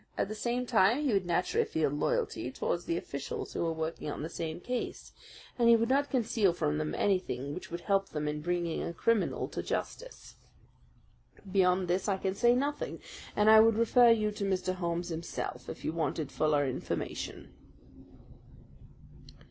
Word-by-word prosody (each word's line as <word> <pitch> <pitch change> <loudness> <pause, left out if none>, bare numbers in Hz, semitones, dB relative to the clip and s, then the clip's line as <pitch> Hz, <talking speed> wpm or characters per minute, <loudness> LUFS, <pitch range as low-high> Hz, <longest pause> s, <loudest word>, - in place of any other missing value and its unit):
At - - 0
the - - -3
same 240 +3 -2
time, 235 +3 +3
he 270 -6 +1
would 195 -3 +1
naturally 175 +1 +1
feel 160 -3 0
loyalty 145 -3 -1
towards 175 +6 -2
the 170 - -1
officials 140 -4 -5
who - - -2
were 165 - 0
working 160 -1 -4
on 145 - -4
the 160 - -4
same 160 0 -4
case, 250 +6 -4 0.5
and 235 -1 +5
he 235 - +8
would 230 +1 +1
not 280 +2 +2
conceal 230 -7 +2
from 75 - -1
them 75 0 -2
anything 145 -9 0
which 180 - -7
would 170 +1 -5
help 195 +1 +1
them 150 -1 -3
in 150 0 -2
bringing 175 0 -1
a 170 - -4
criminal 230 +4 +1
to - - -4
justice. - - -5 1.1
Beyond 185 -1 +3
this 185 +3 0
I 195 - +1
can 190 0 -1
say 240 +4 +4
nothing, 285 +3 -2 0.4
and 210 0 +3
I 220 0 +9
would 225 0 +6
refer 235 +2 +5
you 215 -2 +3
to 205 - -5
Mr. 185 -1 0
Holmes 175 -1 -2
himself 165 0 -5
if - - -8
you 155 - -1
wanted 155 -2 -2
fuller 150 -2 +2
information." 130 - -4
185 Hz, 175 wpm, -31 LUFS, 165-225 Hz, 1.1 s, I